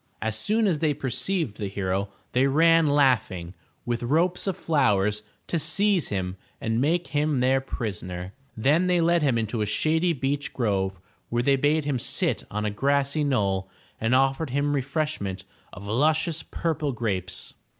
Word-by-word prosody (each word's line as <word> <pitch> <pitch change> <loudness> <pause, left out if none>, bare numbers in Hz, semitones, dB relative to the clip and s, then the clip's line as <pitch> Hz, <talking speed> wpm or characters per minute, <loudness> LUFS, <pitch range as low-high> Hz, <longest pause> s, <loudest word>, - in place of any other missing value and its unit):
As 110 -1 -2
soon 215 - +1
as 175 -7 +1
they 150 -2 +1
perceived 135 - -2
the 105 - -3
hero, 95 0 -2 0.2
they 130 +2 +3
ran 165 +3 +4
laughing, 125 -12 +2 0.3
with 120 -1 -1
ropes 165 +10 +1
of 190 - -1
flowers, 105 -9 +1 0.2
to 170 - -1
seize 185 +4 +2
him 95 -1 -3 0.2
and 115 -3 -1
make 170 +5 +1
him 145 -1 +1
their 130 +1 +3
prisoner. 95 -7 -5 0.2
Then 150 +10 +3
they 180 -1 +3
led 170 0 +3
him 135 -5 +2
into 110 0 -2
a 105 - 0
shady 160 - +1
beech 140 0 -2
grove, 95 -6 -1 0.3
where 120 +1 0
they 140 +2 +4
bade 145 +2 +1
him 140 -4 0
sit - - 0
on 105 +1 -3
a 105 - 0
grassy 140 +6 +1
knoll 100 -9 0 0.3
and 115 +3 +2
offered 135 +3 +2
him 140 +3 0
refresh 145 +2 -1
ment 95 -1 -4 0.3
of 100 +1 -10
luscious 155 - +1
purple 150 -2 -2
grapes. 95 -6 -3
135 Hz, 165 wpm, -25 LUFS, 105-155 Hz, 0.3 s, ran